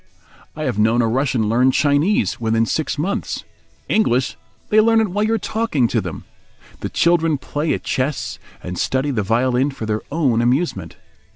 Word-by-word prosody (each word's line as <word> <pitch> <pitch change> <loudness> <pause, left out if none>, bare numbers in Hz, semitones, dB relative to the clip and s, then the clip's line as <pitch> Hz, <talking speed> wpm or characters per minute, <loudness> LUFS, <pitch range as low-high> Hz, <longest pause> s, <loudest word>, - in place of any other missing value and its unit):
I 155 - -4
have 125 -7 -1
known 115 +3 +3
a - - +2
Russian 125 -2 0
learn 125 +4 +3
Chinese 145 - +1
within 115 0 +2
six 155 +7 -2
months. 180 +7 -2 0.4
English! 130 - +1 0.3
they 215 +1 +5
learn 225 +1 +4
it 220 -2 +1
while 205 +4 -1
you 225 +1 +1
are - - +1
talking 220 - 0
to 115 - +1
them. 90 -4 -6 0.6
The - - -4
children 165 -3 +2
play 150 +3 -3
at - - -7
chess 130 +2 -2 0.2
and 90 0 -5
study 135 +2 0
the 115 -5 0
violin 125 +6 +1
for 135 -5 -6
their 110 0 -1
own 135 -7 +2
amusement. 130 +9 0
130 Hz, 175 wpm, -20 LUFS, 115-165 Hz, 0.6 s, they